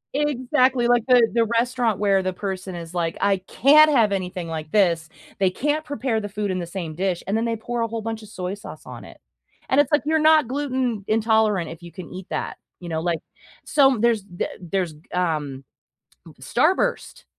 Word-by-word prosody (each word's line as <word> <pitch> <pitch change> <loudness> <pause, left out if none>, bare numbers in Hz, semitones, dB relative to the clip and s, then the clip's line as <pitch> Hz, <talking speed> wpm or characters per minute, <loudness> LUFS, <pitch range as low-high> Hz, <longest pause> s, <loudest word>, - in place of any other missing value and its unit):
Exactly, 260 -3 +2
like 240 -2 +3
the 245 -3 +6
the 230 -1 +3
restaurant 235 -1 0
where 195 -2 +2
the 185 0 -2
person 190 -1 -5
is 170 0 -8
like, 170 -2 -2
"I 200 -1 +2
can't 290 +11 +5
have 230 -8 +3
anything 180 -2 -3
like 160 -1 -5
this, 170 -6 +2 0.3
they 190 -1 +3
can't 295 +9 -1
prepare 260 -6 -2
the 205 - -5
food 205 -1 -3
in 185 - -2
the 170 - -5
same 170 -3 -5
dish." 185 +1 -2
And 200 +3 -1
then 225 +1 0
they 230 -1 -1
pour 235 +2 -4
a 230 - +1
whole 225 0 -4
bunch 225 -1 -4
of 210 - -13
soy 185 -1 -4
sauce 205 - -10
on - - -9
it, - - -14 0.5
and 275 +2 +5
it's 285 - -3
like, 295 - +3
"You're 315 +1 +2
not 310 -4 +5
gluten 260 -6 -2
intolerant 215 -5 +2
if 165 +1 -10
you 170 -1 -11
can 180 -3 -9
eat 185 0 -8
that, - - -4 0.2
you 175 -1 -8
know?" 160 0 -2
Like, 170 -2 -1 0.5
som 270 -6 +3
there's 230 -4 +2
the 175 -3 -4
there's, 175 -2 -2 0.2
um, 150 -6 -1 0.6
m - - -12
Starburst - - 0
210 Hz, 205 wpm, -23 LUFS, 180-245 Hz, 0.6 s, the